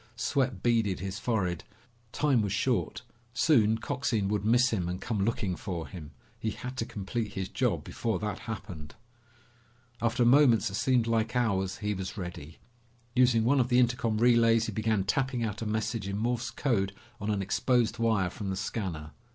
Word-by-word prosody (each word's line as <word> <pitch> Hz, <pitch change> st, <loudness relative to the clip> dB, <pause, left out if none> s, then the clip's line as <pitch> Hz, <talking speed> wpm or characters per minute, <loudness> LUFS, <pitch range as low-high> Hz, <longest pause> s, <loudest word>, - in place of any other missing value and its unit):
Sweat 125 Hz, -4 st, -1 dB
beaded 115 Hz, -5 st, +2 dB
his 95 Hz, 0 st, -4 dB
forehead. 90 Hz, -8 st, -1 dB, 0.5 s
Time 140 Hz, -6 st, +2 dB
was 100 Hz, -2 st, -1 dB
short. 120 Hz, +5 st, 0 dB, 0.3 s
Soon 110 Hz, -9 st, +4 dB
Coxine 115 Hz, -4 st, -1 dB
would 105 Hz, -1 st, -1 dB
miss 120 Hz, +4 st, +4 dB
him 90 Hz, -6 st, -1 dB
and 90 Hz, +1 st, -3 dB
come 105 Hz, -5 st, -2 dB
looking 105 Hz, -4 st, -1 dB
for 85 Hz, -4 st, -5 dB
him. 85 Hz, -6 st, -9 dB, 0.3 s
He 110 Hz, -, -1 dB
had 125 Hz, +4 st, -6 dB
to 115 Hz, -, -2 dB
complete 105 Hz, +2 st, -4 dB
his 95 Hz, -1 st, -3 dB
job -, -, 0 dB
before 115 Hz, -2 st, -2 dB
that 105 Hz, 0 st, -4 dB
happened. 90 Hz, -9 st, -7 dB, 1.1 s
After 120 Hz, +1 st, +2 dB
moments 120 Hz, -4 st, +5 dB
that -, -, -9 dB
seemed 125 Hz, +2 st, +2 dB
like 115 Hz, 0 st, 0 dB
hours 95 Hz, -6 st, 0 dB
he 105 Hz, -, +1 dB
was 95 Hz, +2 st, -5 dB
ready. 85 Hz, -5 st, -7 dB, 0.6 s
Using 125 Hz, -3 st, +4 dB
one 135 Hz, +4 st, +3 dB
of 125 Hz, -1 st, +2 dB
the 125 Hz, -, +3 dB
intercom 120 Hz, -2 st, +2 dB
relays 115 Hz, -1 st, +4 dB
he -, -, -3 dB
began 110 Hz, -3 st, 0 dB
tapping 125 Hz, +4 st, 0 dB
out 110 Hz, -1 st, -3 dB
a 110 Hz, -, -2 dB
message 110 Hz, -1 st, -2 dB
in 100 Hz, 0 st, -3 dB
Morse 120 Hz, +2 st, -1 dB
code 115 Hz, -7 st, 0 dB, 0.3 s
on 105 Hz, 0 st, -3 dB
an 100 Hz, -2 st, 0 dB
exposed 115 Hz, +3 st, +1 dB
wire 110 Hz, -6 st, +1 dB
from 100 Hz, -1 st, -5 dB
the 95 Hz, -, -1 dB
scanner. 95 Hz, -6 st, -4 dB
110 Hz, 175 wpm, -29 LUFS, 95-120 Hz, 1.1 s, moments